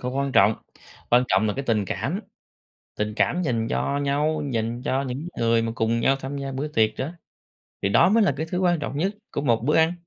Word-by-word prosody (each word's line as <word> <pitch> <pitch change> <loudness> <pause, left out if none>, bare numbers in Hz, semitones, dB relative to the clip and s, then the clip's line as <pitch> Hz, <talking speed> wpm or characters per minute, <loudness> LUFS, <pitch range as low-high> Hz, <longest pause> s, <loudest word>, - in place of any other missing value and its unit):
không 125 0 -3
có 135 - -2
quan 140 -1 -2
trọng. 105 0 +5 0.6
Quan 125 +1 +5
trọng 95 +3 +3
là 105 - +1
cái 140 - -3
tình 105 -3 +1
cảm, - - -3 0.8
tình 105 0 -2
cảm 180 +8 +1
dành 115 -7 -1
cho 140 +4 -1
nhau, 145 +2 0
dành 115 +1 -2
cho 135 -1 0
những 140 +5 -5
người 115 0 +2
mà 115 - -2
cùng 115 0 0
nhau 135 +3 +3
tham 135 +1 -6
gia 135 -1 -4
bữa 140 +3 -3
tiệc 110 -6 +2
đó 140 +6 -3 0.7
thì 100 - +2
đó 100 - +5
mới 220 +3 +4
là 195 - +3
cái 160 +3 -3
thứ 180 - -1
quan 175 -2 +2
trọng 140 -1 -4
nhất 190 +6 0 0.2
của - - -2
một 115 -5 +1
bữa 150 +3 +2
ăn. 160 +1 +4
135 Hz, 240 wpm, -24 LUFS, 115-150 Hz, 0.8 s, trọng